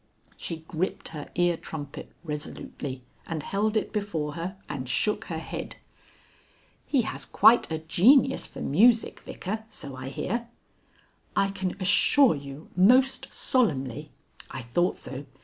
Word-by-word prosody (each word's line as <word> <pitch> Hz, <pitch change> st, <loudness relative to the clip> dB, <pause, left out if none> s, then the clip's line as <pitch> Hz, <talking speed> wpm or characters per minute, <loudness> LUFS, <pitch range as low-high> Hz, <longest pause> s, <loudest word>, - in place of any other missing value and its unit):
She 165 Hz, -2 st, -6 dB
gripped 175 Hz, +4 st, -3 dB
her 150 Hz, -3 st, -7 dB
ear 175 Hz, -1 st, +3 dB
trumpet 145 Hz, -4 st, -8 dB
resolutely, 145 Hz, -4 st, -6 dB, 0.2 s
and 160 Hz, -3 st, -3 dB
held 210 Hz, +4 st, 0 dB
it -, -, -2 dB
before 170 Hz, -9 st, -2 dB
her 175 Hz, +4 st, -5 dB
and 130 Hz, -3 st, -5 dB
shook 210 Hz, +8 st, 0 dB
her 165 Hz, -, -4 dB
head. 160 Hz, -, -6 dB, 1.1 s
"He 265 Hz, -5 st, +2 dB
has -, -, -5 dB
quite 235 Hz, -6 st, +5 dB
a 160 Hz, -, 0 dB
genius 240 Hz, -, +4 dB
for -, -, -9 dB
music, 225 Hz, -, +3 dB
Vicar, 215 Hz, +4 st, -5 dB
so 140 Hz, -9 st, -8 dB
I 130 Hz, +1 st, -6 dB
hear?" 235 Hz, -, -3 dB, 0.9 s
"I 195 Hz, -, +3 dB
can 190 Hz, -2 st, -3 dB
assure 250 Hz, -, +5 dB
you 140 Hz, +1 st, -9 dB
most 250 Hz, +9 st, +4 dB
solemnly 150 Hz, -, 0 dB, 0.2 s
" -, -, -14 dB
"I 130 Hz, -, -6 dB
thought 175 Hz, +10 st, 0 dB
so. 140 Hz, +2 st, -7 dB
175 Hz, 140 wpm, -27 LUFS, 145-215 Hz, 1.1 s, quite